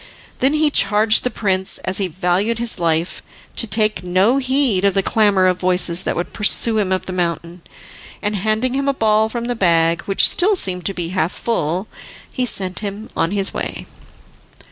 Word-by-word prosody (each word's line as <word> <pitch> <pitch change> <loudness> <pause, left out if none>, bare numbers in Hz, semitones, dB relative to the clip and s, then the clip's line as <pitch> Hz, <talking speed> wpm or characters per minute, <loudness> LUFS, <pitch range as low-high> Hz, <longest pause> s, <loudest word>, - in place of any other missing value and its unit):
Then 270 +4 +2
he 305 -1 +2
charged 215 -1 +3
the 250 - 0
prince, 190 -4 -2
as 185 - -1
he 195 - 0
valued 185 +6 -1
his 235 -1 -1
life, 165 0 -1 0.3
to 230 - +4
take 215 -1 +1
no 185 +8 +2
heed 260 -7 +1
of 200 -1 +2
the 195 - +1
clamour 205 -4 +2
of 185 -1 +1
voices 180 -1 +2
that - - -2
would 175 - -4
pursue 220 +1 +3
him 195 -3 -1
up 185 - -1
the 185 - -5
mountain, 170 0 -3 0.6
and 205 +1 -2
handing 215 +5 -1
him 275 +1 -2
a 280 - +1
ball 220 -2 +2
from 235 +1 -5
the 245 - -2
bag, 170 -5 +1
which 195 - +3
still 400 +3 +2
seemed 180 - -2
to 195 - -4
be 170 -2 -3
half 180 -2 -1
full, 185 -3 -2 0.5
he 255 -2 -1
sent 185 -5 -2
him 205 +1 -7
on 165 - 0
his 195 0 +1
way. - - -4
200 Hz, 190 wpm, -18 LUFS, 180-225 Hz, 0.6 s, to